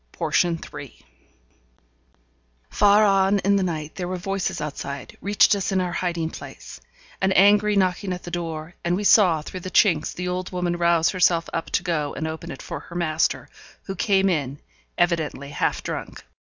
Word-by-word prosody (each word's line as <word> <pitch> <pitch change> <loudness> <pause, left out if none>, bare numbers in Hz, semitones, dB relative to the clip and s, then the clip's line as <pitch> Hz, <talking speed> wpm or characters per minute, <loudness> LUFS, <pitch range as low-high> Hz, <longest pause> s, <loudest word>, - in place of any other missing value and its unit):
Portion 170 -2 +1
3 - - -10 1.7
Far 205 +1 +5
on 195 0 +3
in 200 0 +2
the 200 - +2
night 160 -4 -3
there 180 -2 -4
were 185 0 -3
voices 195 0 -3
outside 140 -2 -6
reached 205 +1 +4
us 200 -1 -1
in 190 - +1
our 180 -1 -1
hiding 170 -2 -2
place; - - -10 0.4
an 190 - +2
angry 205 +2 +5
knocking 185 0 +1
at 180 0 -5
the 175 - -8
door, 165 -1 -5
and 175 +1 +1
we 205 - -2
saw 180 -7 +5
through 185 - -7
the 185 - -7
chinks 170 -5 +3
the 180 0 -5
old 180 0 -3
woman 180 -1 -1
rouse 170 -1 +3
herself 175 -3 +2
up 165 - -3
to - - 0
go 155 -5 -2
and 160 - -3
open 160 -1 -6
it 135 - -8
for - - -6
her 175 - -13
master, 160 -3 0 0.4
who 195 - -5
came 195 0 +2
in, 145 -6 -1 0.4
evidently 160 -5 0
half 145 - -1
drunk. - - -6
175 Hz, 175 wpm, -23 LUFS, 160-190 Hz, 1.7 s, Far